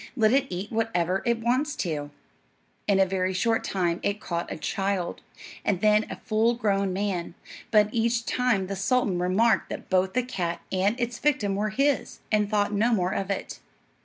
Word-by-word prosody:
Let 220 Hz, -2 st, +3 dB
it 275 Hz, 0 st, +3 dB
eat 185 Hz, +3 st, -5 dB
whatever 195 Hz, -5 st, 0 dB
it 235 Hz, -1 st, +1 dB
wants 260 Hz, +6 st, +1 dB
to." 150 Hz, -5 st, -3 dB, 0.8 s
In 200 Hz, -2 st, +3 dB
a 190 Hz, -, +6 dB
very 185 Hz, 0 st, -1 dB
short 225 Hz, +4 st, +1 dB
time 175 Hz, -3 st, 0 dB
it 200 Hz, +1 st, -1 dB
caught 170 Hz, -4 st, -4 dB
a -, -, -4 dB
child, 195 Hz, +2 st, -2 dB, 0.4 s
and 195 Hz, -4 st, +1 dB
then 210 Hz, +1 st, +3 dB
a -, -, -4 dB
full 225 Hz, +2 st, +1 dB
grown 200 Hz, -4 st, 0 dB
man; 185 Hz, -3 st, -2 dB, 0.3 s
but 210 Hz, -2 st, +5 dB
each 230 Hz, 0 st, +1 dB
time 245 Hz, -6 st, +1 dB
the 195 Hz, +1 st, -4 dB
sultan 195 Hz, -2 st, +1 dB
remarked 195 Hz, +6 st, +2 dB
that -, -, -7 dB
both 185 Hz, 0 st, +2 dB
the 255 Hz, -, +1 dB
cat 175 Hz, -8 st, -3 dB
and 200 Hz, +6 st, +1 dB
its 240 Hz, 0 st, -2 dB
victim 265 Hz, -9 st, +1 dB
were 210 Hz, +2 st, 0 dB
his, 275 Hz, +6 st, 0 dB
and 210 Hz, -1 st, +2 dB
thought 205 Hz, -1 st, +1 dB
no 220 Hz, +4 st, +2 dB
more 185 Hz, -5 st, +1 dB
of 195 Hz, 0 st, -2 dB
it. 195 Hz, -, -4 dB
205 Hz, 185 wpm, -26 LUFS, 185-230 Hz, 0.8 s, a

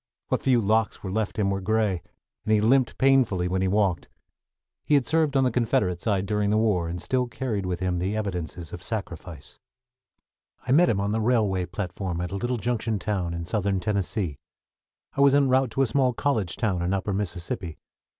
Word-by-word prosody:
What -, -, 0 dB
few 130 Hz, -3 st, +3 dB
locks 110 Hz, +2 st, +1 dB
were 95 Hz, -, -4 dB
left 110 Hz, +1 st, -2 dB
him 100 Hz, -2 st, +1 dB
were 100 Hz, 0 st, -2 dB
gray, 105 Hz, -3 st, +1 dB, 0.4 s
and 110 Hz, -, -2 dB
he 110 Hz, -, +5 dB
limped 120 Hz, +3 st, +3 dB
painfully 130 Hz, -10 st, +3 dB
when 95 Hz, +1 st, -1 dB
he 95 Hz, -, +1 dB
walked. 95 Hz, -3 st, +1 dB, 0.8 s
He 150 Hz, -, +4 dB
had 140 Hz, -3 st, +3 dB
served 155 Hz, 0 st, +2 dB
on 135 Hz, -, +4 dB
the 125 Hz, -, +2 dB
Confederate 105 Hz, -7 st, 0 dB
side 100 Hz, -3 st, 0 dB
during 105 Hz, 0 st, 0 dB
the 105 Hz, -, +2 dB
war, 105 Hz, -6 st, +1 dB
and 90 Hz, +1 st, -4 dB
still 125 Hz, +5 st, 0 dB
carried 110 Hz, -6 st, -3 dB
with 90 Hz, -1 st, -3 dB
him 90 Hz, -1 st, 0 dB
the 95 Hz, +4 st, -1 dB
evidences 90 Hz, -5 st, -4 dB
of 85 Hz, -, -7 dB
sacrifice. 90 Hz, -, -6 dB, 1.1 s
I 125 Hz, -, -2 dB
met 170 Hz, +6 st, +5 dB
him 100 Hz, -, +1 dB
on 100 Hz, +1 st, -1 dB
the 110 Hz, +1 st, 0 dB
railway 105 Hz, -6 st, +1 dB
platform 90 Hz, -1 st, -4 dB
at 90 Hz, 0 st, -3 dB
a -, -, -3 dB
little 120 Hz, +4 st, -1 dB
junction 115 Hz, -1 st, -1 dB
town 90 Hz, -3 st, -2 dB
in 85 Hz, 0 st, -4 dB
Southern 100 Hz, +1 st, 0 dB
Tennessee. 95 Hz, -, -2 dB, 0.8 s
I 140 Hz, -, +1 dB
was 140 Hz, 0 st, +6 dB
en 140 Hz, -2 st, +4 dB
route 130 Hz, 0 st, +3 dB
to 135 Hz, -, +2 dB
a -, -, +3 dB
small 130 Hz, +1 st, +2 dB
college 115 Hz, -9 st, -1 dB
town 100 Hz, -6 st, 0 dB
in 90 Hz, +3 st, 0 dB
Upper 95 Hz, +1 st, -2 dB
Mississippi. 90 Hz, -3 st, -4 dB
105 Hz, 200 wpm, -25 LUFS, 90-120 Hz, 1.1 s, was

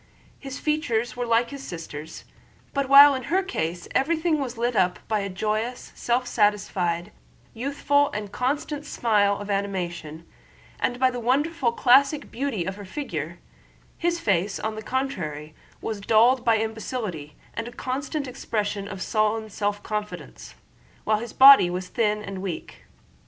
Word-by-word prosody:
His 270 Hz, -1 st, -7 dB
features 245 Hz, -7 st, -1 dB
were 245 Hz, -1 st, -3 dB
like 235 Hz, +1 st, +2 dB
his 280 Hz, -1 st, -7 dB
sister's, 160 Hz, -, -8 dB, 0.5 s
but 275 Hz, -2 st, -1 dB
while 280 Hz, +1 st, +10 dB
in 260 Hz, -2 st, -4 dB
her 380 Hz, +3 st, +1 dB
case 175 Hz, -, -3 dB
everything 320 Hz, +2 st, +1 dB
was 255 Hz, -4 st, -4 dB
lit 240 Hz, +1 st, 0 dB
up 180 Hz, -2 st, +2 dB
by 215 Hz, -1 st, +1 dB
a 200 Hz, 0 st, -3 dB
joyous, 215 Hz, +5 st, -3 dB
self 245 Hz, +1 st, 0 dB
satisfied, 200 Hz, -6 st, 0 dB, 0.4 s
youthful, 285 Hz, +3 st, +1 dB
and 210 Hz, -1 st, -5 dB
constant 285 Hz, +4 st, -2 dB
smile 210 Hz, -8 st, +1 dB
of 205 Hz, 0 st, -5 dB
animation, 175 Hz, -5 st, -3 dB, 0.5 s
and 245 Hz, -, 0 dB
by 260 Hz, 0 st, +4 dB
the 245 Hz, -, -5 dB
wonderful 265 Hz, +2 st, +1 dB
classic 275 Hz, +5 st, +3 dB
beauty 245 Hz, -8 st, -2 dB
of 190 Hz, +2 st, -4 dB
her 205 Hz, -, -8 dB
figure, 175 Hz, -, -5 dB, 0.6 s
his 345 Hz, 0 st, -1 dB
face 195 Hz, -, 0 dB
on 220 Hz, 0 st, -2 dB
the 215 Hz, -, -6 dB
contrary 155 Hz, -, -3 dB, 0.3 s
was 215 Hz, -2 st, -4 dB
dulled 235 Hz, +5 st, +4 dB
by 230 Hz, -2 st, +4 dB
imbecility 220 Hz, -, -4 dB, 0.2 s
and 230 Hz, -, -4 dB
a -, -, -7 dB
constant 275 Hz, +4 st, -3 dB
expression 210 Hz, -5 st, -3 dB
of 195 Hz, -2 st, -5 dB
sullen 215 Hz, 0 st, 0 dB
self 205 Hz, 0 st, -2 dB
confidence, 210 Hz, -1 st, -6 dB, 0.5 s
while 215 Hz, -1 st, +1 dB
his 235 Hz, 0 st, -6 dB
body 270 Hz, -9 st, +8 dB
was 180 Hz, +1 st, -4 dB
thin 210 Hz, -2 st, 0 dB
and 195 Hz, -2 st, -6 dB
weak. 185 Hz, -4 st, -6 dB
225 Hz, 150 wpm, -25 LUFS, 200-265 Hz, 0.6 s, while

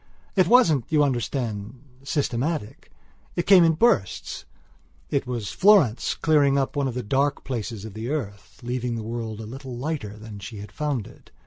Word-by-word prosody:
It 185 Hz, -3 st, +4 dB
wasn't, 170 Hz, -, +5 dB
you 150 Hz, -2 st, +4 dB
understand, 120 Hz, -3 st, -2 dB, 0.2 s
systematic. 140 Hz, -1 st, -2 dB, 0.5 s
It 175 Hz, -, -1 dB
came 190 Hz, -3 st, +7 dB
in 165 Hz, -1 st, +4 dB
bursts. 160 Hz, -, +1 dB, 0.7 s
It 135 Hz, -2 st, 0 dB
was 120 Hz, -5 st, -3 dB
Florence 185 Hz, -, +4 dB
clearing 145 Hz, -3 st, +3 dB
up 135 Hz, +1 st, -1 dB
one 140 Hz, -1 st, +1 dB
of 125 Hz, -, -4 dB
the 125 Hz, -, -3 dB
dark 140 Hz, +6 st, 0 dB
places 115 Hz, -4 st, -4 dB
of 110 Hz, -, -8 dB
the 110 Hz, +3 st, -5 dB
earth, 110 Hz, -10 st, -5 dB
leaving 120 Hz, 0 st, -2 dB
the 115 Hz, -, -4 dB
world 115 Hz, -1 st, -5 dB
a 110 Hz, -, -6 dB
little 130 Hz, +2 st, -8 dB
lighter 125 Hz, -7 st, -4 dB
than 105 Hz, -1 st, -9 dB
she 105 Hz, +3 st, -8 dB
had 105 Hz, +1 st, -9 dB
found 145 Hz, -8 st, -2 dB
it. -, -, -16 dB
130 Hz, 175 wpm, -24 LUFS, 110-150 Hz, 0.7 s, came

